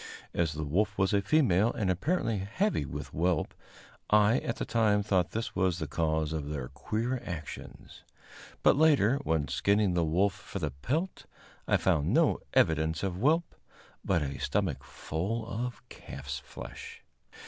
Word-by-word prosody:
As 80 -2 0
the 80 +1 -4
wolf 100 +8 0
was 95 +1 +2
a 100 - +3
female 110 - +3
and 100 -4 0
apparently 115 - 0
heavy 115 - 0
with - - -6
whelp, 85 0 0 0.6
I 105 +3 +5
at 115 - -3
the - - -3
time 105 -3 +2
thought 95 -4 +1
this 115 +1 -4
was 90 -2 +1
the 80 - -3
cause 80 0 0
of 75 -2 -3
their 70 -4 -4
queer 115 - -2
actions; 80 -5 -8 0.6
but - - +6
later, 140 -5 +4
when 80 - 0
skinning 100 -2 +2
the 85 -1 +2
wolf 90 +5 +2
for - - -8
the 75 -6 -2
pelt, 145 - -3 0.4
I - - +4
found 80 -6 +1
no - - +3 0.2
evidence 80 +1 +2
of 95 -2 -2
whelp, 155 - +2 0.5
but 85 -5 +1
a 70 -1 -4
stomach 85 -10 -1
full 85 - -4
of 120 +2 -5
calf's 70 0 -7
flesh. - - -10
95 Hz, 160 wpm, -30 LUFS, 80-115 Hz, 0.6 s, but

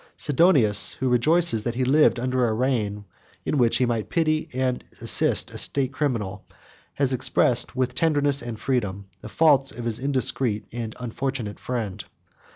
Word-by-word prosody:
Sidonius, 140 - +3
who 130 - -2
rejoices 150 +1 +3
that 120 +2 -4
he 130 - -1
lived 140 -1 +3
under 125 0 0
a 110 - -1
reign 110 -4 -2 0.4
in 150 - -1
which 120 -2 +2
he 130 - +1
might 115 -3 -3
pity 155 -2 0
and 130 0 -2 0.2
assist - - +1
a - - -5
state 135 -1 0
criminal, 115 -9 -3 0.5
has 135 -2 +1
expressed, 125 - +2
with 130 -1 -1
tenderness 145 0 +1
and 120 -2 -7
freedom, 100 -7 -2 0.2
the 110 - -9
faults 140 -1 +3
of 120 - -8
his 115 -2 -1
indiscreet 130 -5 -1
and 115 -2 -6
unfortunate 125 -3 -4
friend. 105 -6 -5
125 Hz, 160 wpm, -23 LUFS, 115-140 Hz, 0.5 s, Sidonius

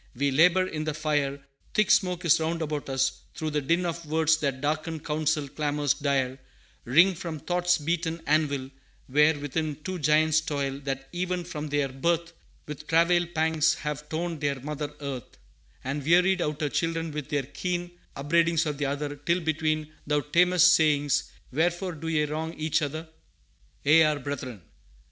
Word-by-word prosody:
We 140 +3 +1
labor 180 +6 +5
in 155 -4 -4
the 155 -2 -2
fire, 145 -3 -1 0.3
Thick 215 -1 +3
smoke 180 -1 +2
is 165 - +5
round 165 +1 -1
about 150 -2 -4
us; 135 0 0
through 155 -1 -3
the 150 0 0
din 170 +6 +1
Of 170 -1 -4
words 160 0 +3
that 140 -4 -2
darken 155 +3 -2
counsel 150 -1 -1
clamors 145 0 0
dire 135 -2 -1 0.5
Ring 170 +10 +5
from 170 -2 -5
thought's 175 +3 +1
beaten 165 +2 -2
anvil, 145 -3 +1 0.3
where 150 +3 +3
within 145 +1 -3
Two 185 0 -4
Giants 155 +1 +3
toil, 140 -3 -3
that 135 -1 -3
even 180 0 -2
from 155 -3 -5
their 145 -1 +1
birth 170 +5 -1 0.3
With 150 0 -8
travail 170 +1 +3
pangs 160 -1 +2
have 150 0 -5
torn 165 0 -3
their 140 -2 -1
mother 150 +1 -4
Earth, 135 -4 -6 0.5
And 140 +2 -3
wearied 180 +4 +4
out 150 -1 -2
her 150 - 0
children 165 +1 -1
with 150 -2 -5
their 145 -2 0
keen 175 +5 -4 0.2
Upbraidings 165 +3 +2
of 150 -2 -3
the 145 - 0
other, 145 +1 -3
till 170 +5 0
between 155 -1 -1
Thou 150 0 +2
tamest, 180 +4 +5
saying, 145 -2 +2 0.4
'Wherefore 175 +6 0
do 160 -1 -7
ye 155 -2 +1
wrong 160 +2 -4
Each 155 +1 0
other? 155 +3 -4 0.8
ye 155 +3 +6
are 155 -1 +3
Brethren.' 130 - -6
155 Hz, 165 wpm, -27 LUFS, 145-165 Hz, 0.8 s, ye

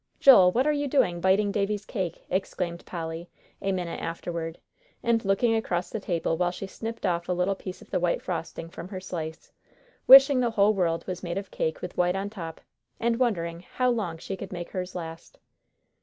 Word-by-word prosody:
"Joel, 195 -10 +8
what 250 +7 +2
are 300 - +4
you 290 -1 -1
doing, 180 -11 +2
biting 195 +3 +3
Davie's 205 0 -1
cake!" 185 -7 -4
exclaimed 180 -2 -2
Polly, 165 0 -5 0.3
a 195 - 0
minute 180 -3 -3
afterward, 165 0 -4 0.5
and 230 -1 +2
looking 220 +4 +2
across 180 -5 -1
the 220 - -3
table 170 -4 -1
while 180 +1 +2
she 180 +2 -6
snipped 225 +4 -6
off 170 0 -1
a - - +2
little 180 +2 +1
piece 185 -1 -8
of - - -22
the - - +1
white 175 -1 +1
frosting 165 -2 -4
from 170 - -9
her 190 -1 -6
slice, 160 -4 -6 0.6
wishing 270 0 +10
the 245 -2 +2
whole 215 -1 +4
world 170 -4 0
was 180 -1 -5
made 175 0 -3
of 195 -1 -5
cake 160 - -2
with 180 - -6
white 180 +1 +2
on 200 +1 -3
top, 165 -6 -7 0.4
and 235 0 +1
wondering 170 -9 0
how 250 +7 0
long 200 -9 -2
she 190 +4 -5
could 190 0 -8
make 175 -2 -6
hers 185 -1 -4
last. 165 -2 -7
185 Hz, 200 wpm, -27 LUFS, 170-210 Hz, 0.6 s, wishing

